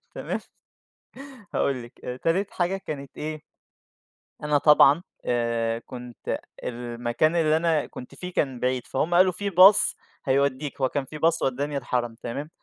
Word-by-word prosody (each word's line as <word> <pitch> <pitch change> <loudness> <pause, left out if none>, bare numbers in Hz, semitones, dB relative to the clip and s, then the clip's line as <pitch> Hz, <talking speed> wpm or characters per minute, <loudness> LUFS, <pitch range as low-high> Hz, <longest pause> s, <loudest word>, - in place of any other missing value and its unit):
تمام. - - -3 1.1
هاقول 130 -3 0
لِك، 120 - -15
آآ، 125 - -4
تالت 185 +8 0
حاجة 180 +2 0
كانت 140 -7 -8
إيه، 155 0 -5 1.0
أنا 150 -1 +3
طبعًا 150 +2 +6 0.2
آآ، 115 -1 0
كُنت 125 -1 -6 0.2
المكان 120 +5 -1
اللي 160 -1 +3
أنا 160 -2 +1
كُنت 125 - -10
فيه 180 0 -7
كان 130 -4 -1
بعيد، 125 -1 -1
فهُم 160 +6 -1
قالوا 185 +1 +6
في 200 +3 -3
باص 190 +3 +6 0.3
هَيوديك، 140 +1 0
هو 130 - +3
كان 140 -2 -2
في 155 +3 -9
باص 165 +2 +2
ودّاني 140 +2 -1
الحرم 120 -3 -2
تمام. 140 +6 -6
140 Hz, 145 wpm, -25 LUFS, 125-165 Hz, 1.1 s, طبعًا